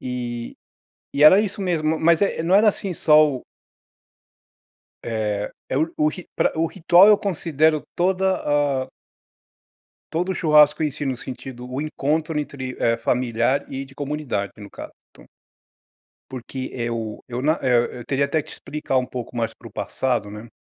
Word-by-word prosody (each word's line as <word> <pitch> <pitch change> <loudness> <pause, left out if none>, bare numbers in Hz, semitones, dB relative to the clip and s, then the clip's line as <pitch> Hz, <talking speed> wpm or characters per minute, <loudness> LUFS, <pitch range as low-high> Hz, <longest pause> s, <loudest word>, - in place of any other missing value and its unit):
E 120 -2 -5 0.6
e 140 - 0
era 185 +6 +9
isso 205 -1 -3
mesmo, 160 -4 0
mas, 170 +3 +3
eh, 200 - 0
não 175 +3 +2
era 210 +2 +6
assim 195 -2 -1
só 155 -1 +5
o 130 -3 -4 1.6
é, 105 -3 -2 0.2
é 130 - 0
o 155 0 0
ri 180 +3 -9
pra - - +2
o 165 - +3
ritual 175 +2 +5
eu 210 -1 +7
considero 160 -5 +1
toda 190 +1 +1
a 145 -3 0 1.2
todo 180 +4 -1
o - - -3
churrasco 150 -2 +4
em 150 - +2
si, 145 0 -6
no 130 - -1
sentido 125 0 -8
o 130 +2 -4
encontro, 155 +1 -1
eh, - - +1
entre 130 -3 -6 0.2
familiar 120 +2 0
e 135 0 -4
de 135 - -17
comunidade, 140 -8 -3
no 105 -1 -10
caso, - - -9 0.2
então. - - -18 1.0
Porque 130 +1 -6
eu 115 -3 -4
eu 125 0 -4
na 155 +3 +3
eu 120 -2 +3
eu 120 - -9
teria 140 0 +1
até 155 +3 0
que - - -12
explicar 135 -3 -2
pouco 125 -1 -7
mais 115 -1 -1
para - - -13
o - - -14
passado, 120 -6 -2
né. 105 +2 -9
140 Hz, 165 wpm, -22 LUFS, 125-160 Hz, 1.6 s, era